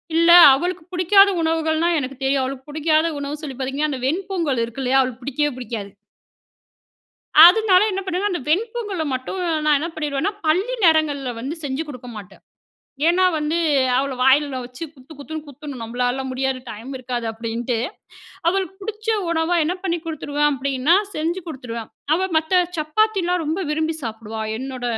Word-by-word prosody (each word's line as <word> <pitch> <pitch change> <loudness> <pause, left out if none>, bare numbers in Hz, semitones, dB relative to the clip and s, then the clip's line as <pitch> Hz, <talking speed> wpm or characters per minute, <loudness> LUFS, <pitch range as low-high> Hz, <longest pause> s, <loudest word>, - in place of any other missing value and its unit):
இல்ல 335 +1 +5 0.2
அவளுக்கு 350 +5 -2
பிடிக்காத 390 +3 +5
உணவுகள்னா 320 0 +1
எனக்கு 265 -1 -5
தெரியும். 270 0 +2
அவளுக்கு 260 0 -5
பிடிக்காத 310 +1 +2
உணவு 285 +1 -5
சொல்லி 275 -3 -6
பார்த்தீங்கன்னா, 275 +3 -2
அந்த 265 - -4
வெண்பொங்கல் 335 -5 -1
இருக்கு 235 +3 -8
இல்லையா, 260 +1 +3
அவளுக்கு 255 -1 -4
பிடிக்கவே 290 +3 -1
பிடிக்காது. 220 -5 -6 1.5
அதனால 370 0 +6
என்ன 390 0 -2
பண்ணுவேன்னா, 380 +2 -1
அந்த 350 - -3
வெண்பொங்கல 415 0 -1
மட்டும் 260 +9 -4 0.3
நான் 300 -1 +4
என்ன 330 +3 -3
பண்ணிருவேன்னா, 300 +6 -2
பள்ளி 380 +11 +1
நேரங்கள்ல 300 -5 +2
வந்து 270 +7 -4
செஞ்சு 280 +2 -2
குடுக்க 250 -4 -9
மாட்டேன். 200 -3 -12 0.7
ஏன்னா 370 +2 +3
வந்து 305 +1 -1 0.4
அவள 275 +1 -1
வாயில 270 +1 +3
வச்சு 250 +5 -9
குத்து 270 +2 -15
குத்துன்னு 310 +2 -7
குத்தணும். 285 -2 -9
"நம்பளால 245 +3 -2
முடியாது. 265 0 -1
டைம் 225 +4 -8
இருக்காது." 245 -2 -4
அப்படீன்ட்டு. 230 +2 -3 0.7
அவளுக்கு 380 0 -1
புடிச்ச 435 +2 -7 0.2
உணவா, 335 +1 +1
என்ன 340 +4 -1
பண்ணி 345 -3 -1
குடுத்துருவேன் 295 -2 -1
அப்படீன்னா, 275 +3 +1 0.2
செஞ்சு 330 +4 -2
குடுத்துருவேன். 240 -7 -7 0.2
அவ 375 +3 0
மத்த 320 +3 +3 0.2
சப்பாத்தில்லாம் 360 +2 +1
ரொம்ப 320 +6 -2
விரும்பி 315 +1 -1
சாப்பிடுவா. 220 -1 -6 0.2
என்னோட 260 0 -6
295 Hz, 150 wpm, -21 LUFS, 260-340 Hz, 1.5 s, அதனால